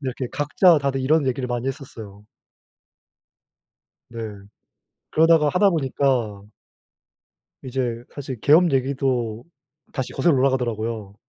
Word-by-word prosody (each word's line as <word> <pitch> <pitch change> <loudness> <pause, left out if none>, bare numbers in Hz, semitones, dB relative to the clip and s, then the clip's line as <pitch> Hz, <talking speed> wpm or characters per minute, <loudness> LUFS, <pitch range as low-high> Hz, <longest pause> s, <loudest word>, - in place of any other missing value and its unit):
이렇게 130 -2 -4
각자 155 +3 +3
다들 140 -1 -1
이런 145 +2 +2
얘기를 130 0 -1
많이 120 +1 -3
했었어요. 110 -7 -8 1.8
네. 115 - -10 0.9
그러다가 160 -1 +4
하다 190 +4 +3
보니까 130 - 0 1.2
이제 125 -2 -3
사실 135 -3 -6
계엄 160 +8 +5
얘기도 130 -4 -1 0.5
다시 130 -3 -4
거슬러 170 -3 +2
올라가더라고요. 115 -6 -1
130 Hz, 260 characters per minute, -22 LUFS, 120-145 Hz, 1.8 s, 계엄